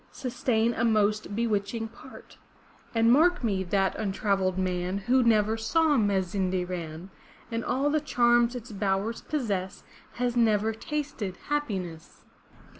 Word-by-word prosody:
Sustain 240 Hz, -3 st, 0 dB
a 230 Hz, -, -1 dB
most 215 Hz, -2 st, +1 dB
bewitching 225 Hz, 0 st, -1 dB
part. 235 Hz, +3 st, -14 dB, 0.6 s
And 230 Hz, +1 st, +4 dB
mark 350 Hz, +3 st, +4 dB
me, 195 Hz, -4 st, 0 dB
that 195 Hz, +1 st, +1 dB
untravelled 195 Hz, -2 st, 0 dB
man 185 Hz, 0 st, -1 dB
Who 245 Hz, +6 st, +2 dB
never 220 Hz, -2 st, +3 dB
saw 305 Hz, +7 st, +2 dB
Ma 205 Hz, -5 st, +2 dB
zin' 185 Hz, +1 st, -2 dB
de 180 Hz, -1 st, -1 dB
ran. 175 Hz, 0 st, -6 dB, 0.4 s
And 230 Hz, 0 st, -2 dB
all 275 Hz, +3 st, 0 dB
the 305 Hz, 0 st, +1 dB
charms 240 Hz, -3 st, +3 dB
its 240 Hz, -1 st, -7 dB
bowers 200 Hz, +2 st, -1 dB
possess 200 Hz, -11 st, -3 dB, 0.3 s
Has 245 Hz, 0 st, -1 dB
never 220 Hz, -2 st, +2 dB
tasted 230 Hz, -6 st, -4 dB
happiness!' 190 Hz, -, -4 dB
220 Hz, 135 wpm, -27 LUFS, 195-240 Hz, 0.6 s, And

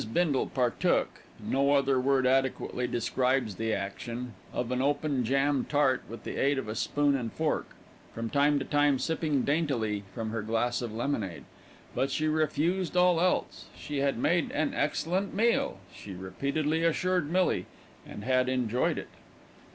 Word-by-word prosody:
Bindle 160 Hz, -7 st, +2 dB
partook, 125 Hz, -3 st, 0 dB, 0.2 s
no 140 Hz, +1 st, +1 dB
other 140 Hz, -2 st, +3 dB
word 130 Hz, 0 st, +2 dB
adequately 130 Hz, -1 st, +1 dB
describes 125 Hz, -2 st, 0 dB
the 110 Hz, 0 st, -1 dB
action, 115 Hz, +5 st, -4 dB, 0.2 s
of 125 Hz, 0 st, -3 dB
an 125 Hz, 0 st, 0 dB
open 145 Hz, -1 st, +1 dB
jam 135 Hz, +3 st, +2 dB
tart 140 Hz, -3 st, +2 dB
with 115 Hz, -, -8 dB
the -, -, -5 dB
aid 140 Hz, +1 st, +2 dB
of 135 Hz, -, -3 dB
a 110 Hz, -, -3 dB
spoon 145 Hz, +5 st, +1 dB
and 120 Hz, -4 st, -3 dB
fork, 160 Hz, -1 st, -2 dB, 0.4 s
from 115 Hz, 0 st, -4 dB
time 145 Hz, +3 st, +3 dB
to 135 Hz, -, -2 dB
time 145 Hz, -2 st, +3 dB
sipping 155 Hz, -3 st, 0 dB
daintily 130 Hz, -9 st, 0 dB
from 110 Hz, -1 st, -3 dB
her 115 Hz, -1 st, -2 dB
glass 115 Hz, +3 st, 0 dB
of 120 Hz, -2 st, -4 dB
lemonade; 110 Hz, -, -3 dB, 0.5 s
but 135 Hz, -, 0 dB
she 155 Hz, +3 st, 0 dB
refused 160 Hz, +4 st, 0 dB
all 180 Hz, -2 st, +4 dB
else. 180 Hz, 0 st, 0 dB
She 145 Hz, -1 st, -4 dB
had 140 Hz, -2 st, +1 dB
made 170 Hz, +6 st, +1 dB
an 150 Hz, 0 st, 0 dB
excellent 180 Hz, +6 st, -1 dB
meal, 230 Hz, -, +2 dB, 0.2 s
she 100 Hz, -, -9 dB
repeatedly 140 Hz, -, -1 dB
assured 170 Hz, -1 st, +1 dB
Millie, 185 Hz, +1 st, +1 dB, 0.4 s
and 105 Hz, -, -9 dB
had 130 Hz, +1 st, +2 dB
enjoyed 125 Hz, -2 st, 0 dB
it. -, -, -6 dB
135 Hz, 160 wpm, -29 LUFS, 120-150 Hz, 0.5 s, all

